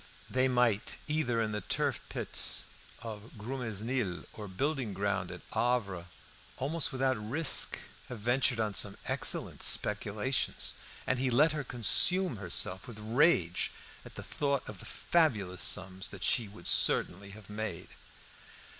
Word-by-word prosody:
They 130 0 +2
might, 120 -5 +1
either 150 -6 0
in 110 -1 0
the 105 0 -3
turf - - -1
peats - - +2 0.4
of 110 0 -8
Grumesnil 115 -3 -3
or 105 -1 -8
building 130 +1 -2
ground 100 -2 -1
at - - -9
Havre, 100 -8 -1 0.5
almost 145 +3 -1
without 130 -1 0
risk, 140 +7 +3 0.3
have 125 - -6
ventured 120 +2 +1
on 110 -2 -1
some 100 0 +1
excellent - - +1
speculations; 105 +5 +2 0.3
and 130 - 0
he 130 0 +1
let 145 +6 +4
her 150 -1 -3
consume 135 - +3
herself 95 0 0
with 120 -3 -9
rage 110 - +2 0.3
at - - -14
the - - -7
thought 140 -2 -2
of 105 -3 -9
the - - -10
fabulous 105 - 0
sums 95 -1 +1
that 95 -3 -8
she 115 -3 +2
would 100 -4 -14
certainly 100 +3 +3
have 100 0 -13
made. 105 -4 -6
115 Hz, 140 wpm, -31 LUFS, 100-130 Hz, 0.5 s, let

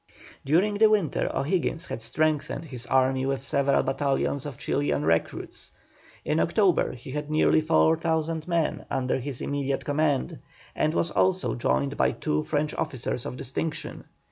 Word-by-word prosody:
During 195 +8 +2
the 220 -1 +7
winter 200 -9 +1
O'Higgins 165 +2 -1
had - - -5
strengthened 155 +6 0
his 125 -5 -6
army 130 0 +2
with 135 -1 -1
several 140 +1 +2
battalions 135 +1 0
of 135 -4 -7
Chilian 145 0 0
recruits; 80 0 -1 0.5
in 155 - +1
October 180 0 +2
he 125 +1 -10
had 150 +1 -4
nearly 155 0 +3
4,000 160 0 +1
men 170 -3 0
under 130 0 0
his 130 -1 -5
immediate 140 -1 -2
command, 145 -2 0 0.4
and 155 +2 +1
was 170 - +1
also 95 -7 +2
joined 65 +3 0
by - - +2
two 75 0 -1
French 150 0 -1
officers 130 -5 -2
of 125 - -6
distinction. 155 +6 -4
145 Hz, 145 wpm, -26 LUFS, 130-160 Hz, 0.5 s, the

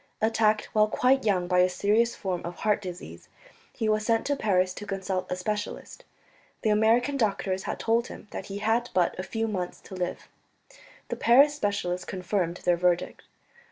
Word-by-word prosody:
Attacked 220 -1 +2
while 215 0 +4
quite 255 +3 +2
young 185 -4 +1
by 180 0 +2
a 180 0 +5
serious 215 +6 +1
form 185 -3 -3
of 175 +1 -6
heart 210 -1 +2
disease, 175 - -9 0.4
he 220 - -3
was 215 0 +1
sent 225 0 +1
to 285 - +1
Paris 185 -7 +1
to 205 +2 -8
consult 190 -1 -3
a - - +1
specialist. 210 - -5 0.6
The 215 - +3
American 230 +6 +3
doctors 195 -4 -1
had - - -3
told 230 +1 +1
him - - -11
that 195 - -6
he 195 - -5
had 225 +3 0
but 180 -2 +3
a - - -2
few 225 +3 -2
months 185 -4 -4
to - - -12
live; 180 -1 -4 0.8
the - - -2
Paris 275 +5 +5
specialist 200 -8 -2
confirmed 180 -2 -2
their 175 -1 +3
verdict. 175 0 0
205 Hz, 180 wpm, -27 LUFS, 180-225 Hz, 0.8 s, a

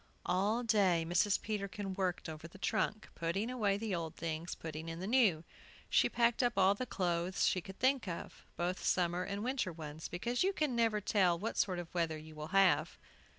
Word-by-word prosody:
All 205 +7 +1
day 195 -7 +3
Mrs. 180 +4 +3
Peterkin 200 -2 -4
worked 185 -3 -2
over 160 +1 -7
the 170 - -14
trunk, 215 +1 -1
putting 195 +8 -2
away 210 -6 +1
the 215 -1 -3
old 165 -3 -3
things, 165 +1 -4
putting 160 0 -6
in 165 0 -5
the 185 - -4
new. 210 -8 +3 0.5
She - - +4
packed 235 +1 +2
up 240 -4 +1
all 190 0 +5
the 250 +5 -4
clothes 180 -2 0
she 185 - +2
could 190 +2 -10
think 260 -3 +2
of, 170 -2 -6
both 180 +2 -2
summer 175 -1 +1
and 200 +2 -4
winter 255 -6 -1
ones, 155 -1 -7
because 235 +8 -2
you 385 +1 +1
never 235 -7 +2
can - - -28
tell 185 -5 +3
what 215 +6 -3
sort 185 -3 +1
of 175 -1 -7
weather 165 -3 0
you 155 0 -11
will 155 0 -6
have. 195 +1 +3
190 Hz, 195 wpm, -34 LUFS, 170-215 Hz, 0.5 s, all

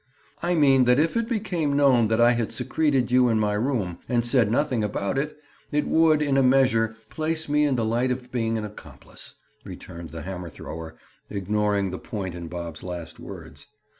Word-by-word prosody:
"I 175 0 +1
mean 135 -4 +5
that 125 +1 +4
if 160 +6 +1
it 230 0 0
became 175 - -1
known 130 -5 +5
that 110 +1 +1
I 120 +1 +6
had 120 -2 -1
secreted 140 -6 0
you 125 -1 +5
in 110 -1 +2
my 105 -1 +1
room 105 -6 -1
and 120 -1 +1
said 120 -3 +3
nothing 125 -3 +1
about 100 +1 -2
it, 150 +2 -3 0.3
it 150 0 0
would, 160 -2 +4
in 140 -2 +1
a - - +5
measure, 125 -4 +3 0.2
place 160 0 -2
me 150 +1 +3
in 140 -3 +2
the 115 -2 0
light 120 +3 +1
of 125 0 -4
being 115 -2 0
an 110 - -3
accomplice," 105 0 -9 0.3
returned 85 -1 -9
the 80 -2 -7
hammer 90 -1 -6
thrower, 80 +1 -8 0.3
ignoring 100 0 0
the 95 - -5
point 95 -5 -5
in 85 -1 -7
Bob's 85 -1 -6
last 85 -3 -7
words. - - -10
120 Hz, 195 wpm, -25 LUFS, 100-140 Hz, 0.3 s, I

